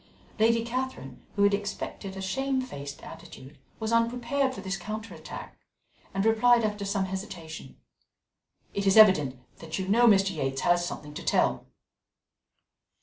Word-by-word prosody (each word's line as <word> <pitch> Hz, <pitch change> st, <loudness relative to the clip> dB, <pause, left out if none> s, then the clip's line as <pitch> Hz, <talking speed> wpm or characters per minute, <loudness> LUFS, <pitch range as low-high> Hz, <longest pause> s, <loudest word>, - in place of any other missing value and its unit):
Lady 230 Hz, +1 st, +3 dB
Catherine, 235 Hz, -, -5 dB
who 200 Hz, -, +2 dB
had 200 Hz, 0 st, +5 dB
expected 200 Hz, -1 st, -4 dB
a 190 Hz, -, -5 dB
shamefaced 255 Hz, -, -3 dB
attitude, 165 Hz, -5 st, -12 dB, 0.2 s
was 220 Hz, 0 st, -2 dB
unprepared 245 Hz, +4 st, +1 dB
for 250 Hz, -, -8 dB
this 190 Hz, 0 st, -3 dB
counter 215 Hz, +4 st, -6 dB
attack, -, -, -9 dB, 0.6 s
and 195 Hz, +2 st, -1 dB
replied 235 Hz, +2 st, +4 dB
after 210 Hz, -1 st, -2 dB
some 195 Hz, -1 st, 0 dB
hesitation: 185 Hz, -7 st, -7 dB, 1.0 s
"It 200 Hz, 0 st, -1 dB
is 195 Hz, -, +4 dB
evident 155 Hz, -12 st, +6 dB, 0.2 s
that 160 Hz, -1 st, -5 dB
you 190 Hz, -, -3 dB
know 235 Hz, +5 st, +5 dB
Mr. 195 Hz, -3 st, +4 dB
Yates 135 Hz, -2 st, -2 dB
has 175 Hz, 0 st, +3 dB
something 150 Hz, -4 st, -6 dB
to -, -, -7 dB
tell." -, -, +1 dB
200 Hz, 145 wpm, -28 LUFS, 175-230 Hz, 1.0 s, evident